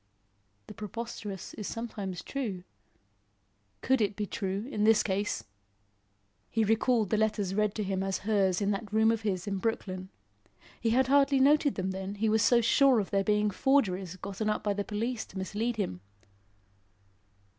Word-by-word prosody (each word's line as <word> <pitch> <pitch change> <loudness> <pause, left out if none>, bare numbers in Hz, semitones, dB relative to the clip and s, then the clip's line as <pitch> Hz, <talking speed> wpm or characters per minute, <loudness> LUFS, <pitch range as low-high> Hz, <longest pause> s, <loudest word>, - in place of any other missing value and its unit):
The - - -10
preposterous 210 -2 -6
is 210 - -6
sometimes 205 -6 -5
true; 215 -10 -4 1.2
could 265 -1 +2
it 205 -1 +1
be 210 - -2
true 200 +2 -3
in 210 - -1
this 220 0 +5
case? 200 +1 -1 1.1
He 225 - +1
recalled 225 0 +2
the 215 - +2
letters 210 -3 0
read 210 0 +1
to 215 - -1
him 190 -1 -2
as 195 -1 -2
hers 195 -3 +2
in 200 0 +1
that 205 0 -4
room 220 +1 +4
of 225 -1 -1
his 190 -4 -2
in 195 -2 -2
Brooklyn. 185 -4 -3 0.7
He 230 - 0
had 255 +3 +3
hardly 275 +1 +4
noted 285 +1 +4
them 190 0 -2
then, 190 +1 -5
he 215 +2 0
was 220 0 +3
so 240 +2 +5
sure 260 +2 +4
of 200 - -3
their 195 0 +2
being 210 0 +2
forgeries, 190 -7 +1
gotten 200 +3 -4
up 210 - -1
by 205 - +1
the 205 0 -2
police 220 +3 -3
to 190 - -11
mislead 215 +5 -2
him. 90 - -3
210 Hz, 170 wpm, -29 LUFS, 195-230 Hz, 1.2 s, this